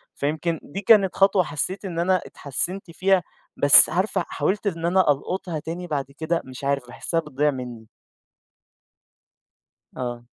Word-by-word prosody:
فيمكن 155 +3 -2
دي 195 +8 -6
كانت 200 -2 +4
خطوة 195 -1 +4
حسّيت 180 +6 -4
إن 170 -3 -4
أنا 185 +1 +2
اتحسّنت 175 +7 -4
فيها، 185 +1 +2 0.3
بس 145 -1 +7
عارفة، 185 +2 0
حاولت 205 +2 -1
إن 165 -3 -2
أنا 180 -3 +4
ألقُطها 165 +3 -3
تاني 170 +4 -6
بعد 145 -4 -2
كده 165 +1 -1
مش 130 +1 -10
عارف، 140 -2 -1
باحسّها 165 +6 -2
بتضيع 150 -1 0
منّي. 125 -4 -7 2.1
آه. 120 -2 -4
165 Hz, 140 wpm, -23 LUFS, 140-185 Hz, 2.1 s, بس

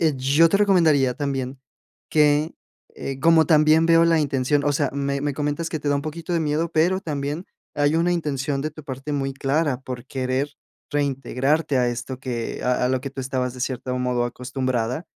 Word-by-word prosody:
eh, 160 -3 +2
yo 140 +6 +4
te 200 - +2
recomendaría 160 -10 +3
también 135 -1 -3 0.5
que, 150 +1 +3 0.4
eh, 135 -1 -5
como 165 -1 +5
también 155 +1 +5
veo 165 0 +5
la 165 -1 +3
intención 140 0 +1
o 145 - +2
sea, 145 0 0
me 140 0 -2
me 145 0 -2
comentas 145 +3 -2
que 160 - -2
te 145 - -2
da 145 - +2
un 140 - -3
poquito 160 +3 -5
de 170 - +1
miedo, 155 +2 0
pero 175 +4 +2
también 150 0 -3 0.3
hay 145 +1 +2
una 170 +2 +2
intención 145 -4 -1
de 155 - -2
tu 155 -1 -12
parte 135 +2 -5
muy 135 -1 -2
clara 135 0 0
por 125 -1 -7
querer 130 +2 -2 0.4
reintegrarte 140 +1 0
a 125 -1 +2
esto 120 +2 -5
que 120 -3 -4
a 125 0 +1
a - - 0
lo 130 0 0
que 140 - -5
tú 135 - -6
estabas 130 -1 -2
de 125 - -9
cierto 125 0 -3
modo 125 -1 0
acostumbrada, 125 +2 -2
140 Hz, 200 wpm, -23 LUFS, 130-155 Hz, 0.5 s, como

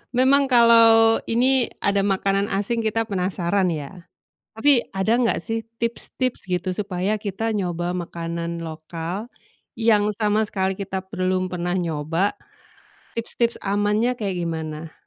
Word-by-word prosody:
Memang 270 +2 +4
kalau 230 -2 +6
ini 250 +2 +2 0.2
ada 200 0 +2
makanan 195 0 +1
asing 230 +4 -1
kita 225 0 0
penasaran 185 -1 0
ya. 165 +2 -5 0.5
Tapi 240 +2 +3
ada 215 +5 +2
enggak 240 -2 +1
sih 225 0 -3 0.2
tips-tips 235 +1 -2
gitu 180 0 -2
supaya 200 +1 -1
kita 210 +2 -3
nyoba 175 -3 -2
makanan 170 0 -4
lokal, 165 +6 -6 0.4
yang 215 -3 +2
sama 215 0 +2
sekali 190 -2 -2
kita 190 -1 -4
belum 185 -2 -1
pernah 175 0 -2
nyoba, 165 +2 -1 0.8
tips-tips 235 0 -2
amannya 210 +5 +1
kayak 195 -4 -2
gimana? 160 -1 -5
200 Hz, 125 wpm, -23 LUFS, 175-225 Hz, 0.8 s, kalau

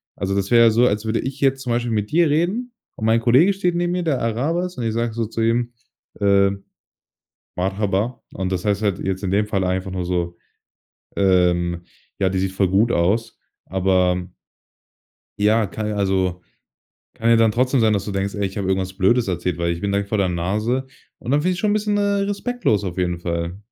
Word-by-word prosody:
Also, 95 0 -2
das 100 +1 -1
wäre 120 -1 +7
ja - - +7
so, 120 +3 +4
als 105 +2 -1
würde 110 +1 0
ich 135 +1 -5
jetzt 135 -1 +2
zum 125 - -3
Beispiel 120 0 -1
mit 105 -1 -1
dir 170 0 +3
reden 185 +12 0 0.2
und 110 - -4
mein 110 +1 +4
Kollege 125 +11 +4
steht 180 -3 -1
neben 175 0 0
mir, 180 0 -1
der 150 -6 0
Araber 140 +11 0
ist, 180 -1 -8
und 125 - -3
ich 110 - -1
sage 115 0 -1
so 115 0 -2
zu 115 +1 -4
ihm: 120 +1 +1 0.5
„Ähm, 100 -1 +2 0.9
Merhaba.“ 100 +5 -1
Und 95 -1 -3
das 90 -1 -2
heißt 105 0 0
halt 100 -4 0
jetzt 95 0 -3
in 95 - -2
dem 105 +2 +1
Fall 100 -3 -1
einfach 95 +1 -1
nur 90 -1 -3
so: 85 -1 -2 0.8
„Ähm, 90 -2 +2 0.4
ja, 95 -1 +2
die 95 0 -1
sieht 95 0 -1
voll 95 0 +1
gut 105 +6 +3
aus.“ 100 +7 0 0.3
Aber 90 -1 +1 1.1
Ja, 110 +2 +3
ka 110 +3 -6
also, 95 -3 0 0.7
kann 115 - -1
ja 115 - +6
dann 115 -1 +4
trotzdem 125 +3 +2
sein, 110 -1 +3
dass 100 -2 0
du 100 - -5
denkst, 100 +1 -2
ey, 100 - -2
ich 95 - -8
habe 95 -2 -2
irgendwas 95 -1 -1
Blödes 105 +5 +2
erzählt, 90 -1 -2
weil 85 0 0
ich 85 - -5
bin 100 +1 -1
direkt 100 0 -1
vor 105 - -1
der 95 -2 +2
Nase. 105 +9 -1 0.3
Und 120 - -6
dann 145 +2 +2
finde 180 - +1
ich's 180 - -4
schon 210 - +1
'n 205 - +2
bisschen, 210 -1 0
äh, - - +1
respektlos 200 - 0
auf 90 -2 -4
jeden 90 -2 -1
Fall. 85 +1 -3
105 Hz, 220 wpm, -21 LUFS, 95-120 Hz, 1.1 s, wäre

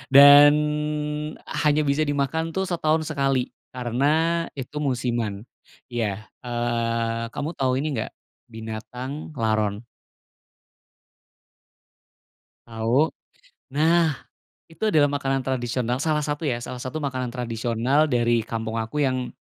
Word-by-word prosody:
dan 145 +1 +10 1.1
hanya 150 0 +3
bisa 145 +1 +1
dimakan 150 +4 -1
tuh 190 - +1
setahun 160 -3 +1
sekali 135 -3 0 0.2
karena 125 +3 0 0.5
itu 140 +2 -5
musiman. 120 -7 -1 0.5
Iya, 110 -4 -2 0.2
eee, 115 -1 -1
kamu 145 +2 -2
tahu 130 -1 +2
ini 150 - -1
nggak, - - -4 0.4
binatang 125 +7 -7
laron? 110 -2 0 2.8
Tahu? 115 +7 +1 0.6
Nah, 160 0 +3 0.5
itu 165 - -10
adalah 150 -8 +4
makanan 135 -1 -1
tradisional 125 -1 -1
salah 150 +1 0
satu, 145 +2 -3
ya, 120 -2 -1
salah 125 - -6
satu 145 +5 -4
makanan 130 -4 -3
tradisional 120 +3 +1
dari 120 -4 +2
kampung 115 -1 -3
aku 115 +7 -2
yang 130 -2 -1
130 Hz, 110 wpm, -24 LUFS, 115-145 Hz, 2.8 s, dan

